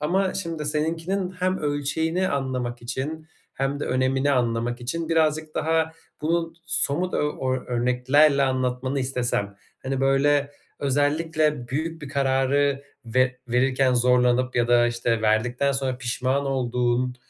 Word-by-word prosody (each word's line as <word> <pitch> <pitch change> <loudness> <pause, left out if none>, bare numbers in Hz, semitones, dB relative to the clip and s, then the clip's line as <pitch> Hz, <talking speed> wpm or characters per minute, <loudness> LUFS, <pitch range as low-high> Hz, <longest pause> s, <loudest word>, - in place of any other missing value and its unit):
ama 185 +5 0
şimdi 165 -5 -4
seninkinin 165 +5 -1
hem 185 +1 -1
ölçeğini 160 +5 -1
anlamak 125 -3 -3
için 150 +6 -4 0.3
hem 135 +2 -2
de - - -1
önemini 130 +2 +1
anlamak 120 -1 0
için 160 +7 -3
birazcık 155 -1 +1
daha 160 0 +1 0.3
bunu 165 +1 0
somut 170 +3 +1
o 135 -3 -1
ö 130 - -4
örneklerle 130 +4 +3
anlatmanı 130 +1 -1
istesem, 120 -6 -1 0.3
hani, 135 0 -2
böyle 140 +1 +2 0.3
özellikle 145 -1 0
büyük 160 +3 -3
bir 140 - -6
kararı 140 0 +1 0.2
ve 130 +2 +1
verirken 130 +1 +2
zorlanıp 125 0 +2
ya 120 0 +2
da, 120 0 +5
işte, 120 -1 -1
verdikten 120 +5 +1
sonra 130 -2 -2
pişman 130 +3 -1
olduğun 125 -1 0
135 Hz, 130 wpm, -24 LUFS, 125-155 Hz, 0.3 s, da